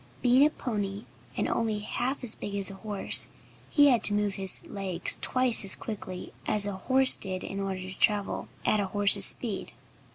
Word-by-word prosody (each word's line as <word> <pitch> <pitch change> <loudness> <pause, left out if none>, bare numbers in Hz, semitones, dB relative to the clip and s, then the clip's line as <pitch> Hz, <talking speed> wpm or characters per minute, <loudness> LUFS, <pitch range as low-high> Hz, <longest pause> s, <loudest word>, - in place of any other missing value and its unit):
Being 250 +2 +4
a 300 - +4
pony, 205 -7 -6 0.3
and - - -2
only 220 -2 -2
half 245 +6 -5
as 230 - +2
big 200 - -8
as 200 -1 +1
a 195 - -12
horse, 205 -1 +2 0.4
he 290 -1 +4
had 240 -4 +1
to 205 - +5
move 205 -1 -2
his 190 -1 -3
legs 190 -4 -1
twice 255 -4 +1
as 195 - +2
quickly 190 -4 -9
as 210 -1 +3
a 205 - -4
horse 260 +7 +5
did 185 -1 -6
in 195 - -7
order 195 -1 -5
to 185 0 -9
travel 205 -2 -1 0.2
at 215 - +1
a 200 - -2
horse's 200 0 +5
speed. 220 -6 +1
205 Hz, 190 wpm, -26 LUFS, 195-230 Hz, 0.4 s, to